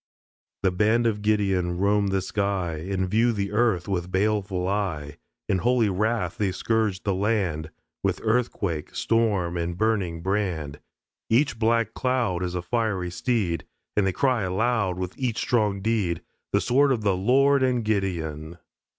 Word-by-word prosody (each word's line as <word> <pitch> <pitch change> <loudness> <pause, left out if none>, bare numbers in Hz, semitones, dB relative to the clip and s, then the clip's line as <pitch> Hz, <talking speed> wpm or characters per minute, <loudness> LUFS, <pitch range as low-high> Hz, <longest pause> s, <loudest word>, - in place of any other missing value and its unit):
The 95 - +3
band 110 +5 +2
of 105 -2 0
Gideon 95 -4 +1
roam 100 +2 +2
the 95 -1 0
sky 95 -5 -1
And 95 -1 0
view 115 +5 +3
the 100 -3 -2
earth 105 -5 +1
with 90 -2 -2
baleful 95 -2 0
eye; 80 -8 -2 0.3
In 95 - +1
holy 120 +2 +2
wrath 110 +5 -1
they 100 -3 +1
scourge 105 0 0
the 100 - 0
land 95 -6 0 0.3
With - - 0
earthquake, 110 -8 -1
storm 100 -7 +1
and 85 0 -3
burning 95 -7 0
brand. 90 -7 -2 0.5
Each 120 0 +2
black 115 -1 +2
cloud 125 -8 0
Is 90 -1 -2
a 90 - -2
fiery 100 -4 -1
steed. 95 -4 -1 0.3
And 100 -2 +2
they - - +2
cry 130 +3 +1
aloud 100 0 0
With 90 -1 -4
each 120 -4 -1
strong 105 -5 +1
deed, 100 -6 0 0.3
"The - - +2
sword 135 +3 +3
of 115 -5 0
the 100 -2 +2
Lord 135 +8 +3
and 125 -3 +1
Gideon." 85 -6 -2
100 Hz, 155 wpm, -25 LUFS, 90-115 Hz, 0.5 s, The